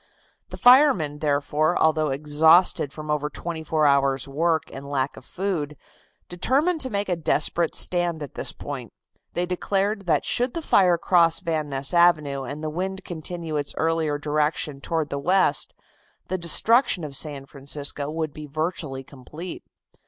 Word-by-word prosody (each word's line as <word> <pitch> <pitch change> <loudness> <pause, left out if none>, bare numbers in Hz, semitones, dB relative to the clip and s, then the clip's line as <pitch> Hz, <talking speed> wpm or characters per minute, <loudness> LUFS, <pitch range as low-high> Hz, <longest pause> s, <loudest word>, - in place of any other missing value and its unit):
The - - -8
firemen, 245 - +5
therefore, 150 +3 0
although 155 -1 +2
exhausted 150 +2 +3
from 155 +1 -6
over 150 0 -1
twenty 165 0 -6
four 155 0 +1
hours' 140 -1 +2
work 160 +3 0
and 140 +1 -8
lack 135 -1 -1
of - - -12
food, 170 -7 -3 0.5
determined 285 - +1
to 260 - 0
make 205 -2 -2
a 180 - 0
desperate 165 +1 0
stand 175 -3 +1
at 140 - -9
this - - 0
point. - - -8 0.4
They 175 - -1
declared 195 +2 -1
that 165 - +2
should 245 +1 0
the 335 - -3
fire 180 - +4
cross 170 -1 +3
Van 160 -4 -2
Ness 135 +1 -1
Avenue 155 -5 +3
and 140 +4 -7
the 155 - -3
wind 190 +3 -4
continue 165 -1 -5
its 145 -1 -3
earlier 160 -2 0
direction 150 -1 -1
toward 160 -1 -2
the 140 - -2
west, 185 +6 +1 0.6
the 185 - -1
destruction 185 - +3
of 145 -2 -6
San 140 -2 -1
Francisco 140 +1 -4
would 155 -1 -3
be 150 -1 -9
virtually 155 -3 -3
complete. 150 +7 -9
155 Hz, 160 wpm, -24 LUFS, 145-175 Hz, 0.6 s, firemen